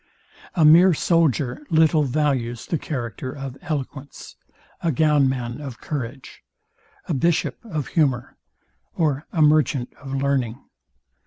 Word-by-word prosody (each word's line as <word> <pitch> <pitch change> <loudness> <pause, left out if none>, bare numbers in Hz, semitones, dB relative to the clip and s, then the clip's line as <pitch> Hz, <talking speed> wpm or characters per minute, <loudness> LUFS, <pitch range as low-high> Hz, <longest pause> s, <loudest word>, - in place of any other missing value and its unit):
A 165 -4 +4
mere 170 +3 +7
soldier 150 -7 +1
little 160 -1 +4
values 130 -4 -1
the 165 - -2
character 125 -3 -5
of 135 -2 -7
eloquence: 145 -2 -6 0.5
A 170 - +1
gownman 135 -3 +1
of 135 -5 -8
courage: 135 -2 -6 0.7
A - - -1
bishop 170 - 0
of 155 - -4
humour: 135 -7 0 0.6
Or 150 -3 0
a 160 - +2
merchant 150 -4 +2
of 135 -1 -6
learning. 135 -4 0
145 Hz, 115 wpm, -23 LUFS, 130-155 Hz, 0.7 s, mere